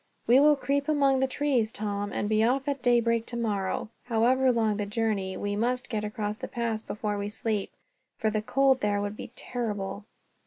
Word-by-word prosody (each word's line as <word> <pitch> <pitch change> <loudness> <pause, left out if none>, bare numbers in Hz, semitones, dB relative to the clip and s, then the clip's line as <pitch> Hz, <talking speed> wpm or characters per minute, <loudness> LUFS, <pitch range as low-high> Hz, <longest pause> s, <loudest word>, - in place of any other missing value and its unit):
"We 245 +3 +6
will 295 +1 +6
creep 280 +2 -1
among 275 -3 +3
the 265 - +2
trees, 260 -5 0
Tom; 205 -1 -3
and 205 - -2
be 215 +1 +2
off 265 +4 +1
at 280 -2 -1
daybreak, 235 -2 +2
tomorrow. 215 -5 -2 0.2
However 250 +3 +3
long 220 -3 +1
the 205 -1 -2
journey, 205 -3 -1
we 205 0 -2
must 245 +4 -1
get 215 -2 -1
across 210 -1 -3
the - - -6
pass 230 -2 -2
before 210 -1 -3
we 200 0 -3
sleep, 210 -1 -2 0.5
for 220 - 0
the 215 0 0
cold 265 +3 +3
there 205 -1 +1
would 205 +1 -3
be - - -8
terrible." 205 -4 -4
225 Hz, 190 wpm, -28 LUFS, 210-255 Hz, 0.5 s, We